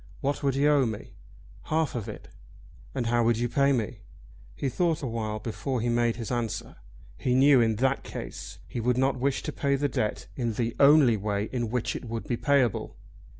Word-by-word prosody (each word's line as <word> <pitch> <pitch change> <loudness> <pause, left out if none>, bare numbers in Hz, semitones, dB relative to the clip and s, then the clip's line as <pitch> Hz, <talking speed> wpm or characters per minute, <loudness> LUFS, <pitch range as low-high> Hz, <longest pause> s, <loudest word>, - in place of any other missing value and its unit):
"What 140 +1 -1
would 140 -2 +1
you 140 +2 +3
owe 140 -4 +4
me?" 110 -2 -6 0.5
"Half 160 -1 0
of 115 -5 -4
it." - - -9 0.7
"And 125 -3 -1
how 120 0 +2
would 115 0 +3
you 120 +1 0
pay 140 +3 +3
me?" 115 -3 -1 0.6
He 65 - -2
thought 165 +2 0
a - - -1
while 110 -2 -3
before 120 +4 -3
he 120 +1 0
made 120 -1 +2
his 115 -1 -5
answer. 115 -1 -3 0.4
He 125 - +1
knew 135 0 +6
that - - +5
in 110 -1 +1
that 135 +4 +1
case - - -7
he - - -5
would 125 +2 +1
not 130 0 +1
wish 140 +1 0
to - - -3
pay 140 0 0
the 145 +1 +1
debt 110 -5 -2
in 120 -3 -1
the 115 +1 -2
only 140 -5 +6
way 100 +1 -2
in 120 -3 -1
which 125 0 -1
it - - -6
would 115 0 -5
be 120 - 0
payable. 130 -3 +1
120 Hz, 210 wpm, -27 LUFS, 115-140 Hz, 0.7 s, knew